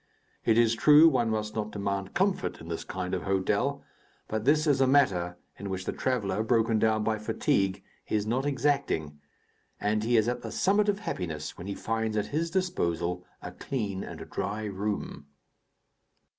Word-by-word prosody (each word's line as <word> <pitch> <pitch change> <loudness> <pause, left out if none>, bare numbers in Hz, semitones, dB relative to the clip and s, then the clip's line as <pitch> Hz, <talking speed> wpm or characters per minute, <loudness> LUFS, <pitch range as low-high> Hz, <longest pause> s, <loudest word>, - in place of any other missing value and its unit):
It 115 -1 +4
is 115 -1 +4
true, 150 +6 +7
one 120 -7 +2
must 105 -1 -2
not 110 -1 -2
demand 100 -2 -3
comfort 195 0 0
in 80 - -10
this 85 - -3
kind 90 0 -4
of 90 - -1
hotel; 95 -1 0 0.4
but 110 0 -3
this 150 +3 +4
is 140 -3 +3
a 135 - +5
matter 95 -11 +2 0.2
in 100 +1 -5
which 95 -1 -4
the - - -1
traveller, 105 -6 -1
broken 115 -1 +2
down 110 -1 +2
by 110 0 0
fatigue, 100 -3 0 0.2
is 105 -1 0
not 120 +5 0
exacting, 135 - 0 0.6
and 105 +1 0
he 120 +1 +3
is 110 0 +3
at 125 - -1
the - - -6
summit 205 +2 +2
of 200 - +1
happiness 80 - -4
when 90 - -8
he 100 - -3
finds 110 -1 -2
at 105 - +1
his 165 +2 0
disposal 90 - -1 0.2
a - - -6
clean 105 -8 -3
and - - -8
dry 105 +2 -3
room. 100 -7 -4
110 Hz, 175 wpm, -28 LUFS, 95-130 Hz, 0.6 s, true